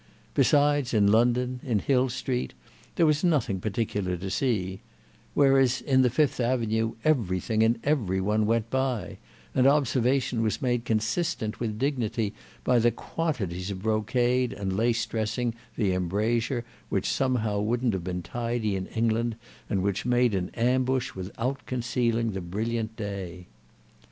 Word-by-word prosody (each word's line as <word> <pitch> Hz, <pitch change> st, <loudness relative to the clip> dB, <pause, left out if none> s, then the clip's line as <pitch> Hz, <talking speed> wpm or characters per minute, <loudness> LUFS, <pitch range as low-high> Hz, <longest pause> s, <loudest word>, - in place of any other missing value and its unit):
Besides, 145 Hz, -4 st, +3 dB
in 100 Hz, -1 st, +4 dB
London, 125 Hz, +3 st, +2 dB
in 120 Hz, -6 st, 0 dB
Hill 130 Hz, +4 st, +2 dB
Street, 125 Hz, 0 st, -3 dB, 0.4 s
there 170 Hz, -, +4 dB
was 150 Hz, +1 st, +2 dB
nothing 140 Hz, -, +1 dB
particular 100 Hz, -3 st, -2 dB
to 95 Hz, +2 st, -5 dB
see; 95 Hz, -6 st, -1 dB, 0.6 s
whereas 135 Hz, -2 st, +4 dB
in 130 Hz, -2 st, +3 dB
the 125 Hz, -, +4 dB
Fifth 135 Hz, +3 st, +1 dB
Avenue 115 Hz, -2 st, 0 dB
everything 110 Hz, -6 st, +1 dB
and 115 Hz, +2 st, +3 dB
every 115 Hz, -11 st, +1 dB
one 105 Hz, +2 st, +1 dB
went 115 Hz, 0 st, 0 dB
by, 130 Hz, -7 st, -1 dB, 0.3 s
and 130 Hz, 0 st, +4 dB
observation 130 Hz, -3 st, +2 dB
was 110 Hz, -3 st, 0 dB
made 120 Hz, -2 st, 0 dB
consistent 110 Hz, +1 st, -1 dB
with 110 Hz, -3 st, -2 dB
dignity 115 Hz, -5 st, -1 dB, 0.3 s
by 125 Hz, -1 st, +3 dB
the 120 Hz, +1 st, +4 dB
quantities 105 Hz, -, -3 dB
of 95 Hz, -1 st, -5 dB
brocade 120 Hz, +3 st, +1 dB
and 95 Hz, -2 st, -3 dB
lace 115 Hz, +2 st, +1 dB
dressing 115 Hz, +2 st, -2 dB, 0.2 s
the 100 Hz, -5 st, +1 dB
embrasure, 115 Hz, +7 st, 0 dB, 0.2 s
which -, -, 0 dB
somehow 115 Hz, -6 st, 0 dB
wouldn't 115 Hz, +2 st, 0 dB
have 95 Hz, -3 st, -3 dB
been 90 Hz, 0 st, -3 dB
tidy 115 Hz, -1 st, -2 dB
in 95 Hz, -1 st, -3 dB
England 115 Hz, 0 st, 0 dB, 0.3 s
and 95 Hz, -2 st, 0 dB
which 100 Hz, -1 st, -1 dB
made 125 Hz, -1 st, +2 dB
an 90 Hz, -2 st, -1 dB
ambush 130 Hz, +2 st, +1 dB
without 115 Hz, +9 st, -4 dB
concealing 120 Hz, -2 st, 0 dB
the 95 Hz, -1 st, -4 dB
brilliant 110 Hz, +5 st, -3 dB
day. 95 Hz, -4 st, -6 dB
115 Hz, 145 wpm, -27 LUFS, 105-125 Hz, 0.6 s, in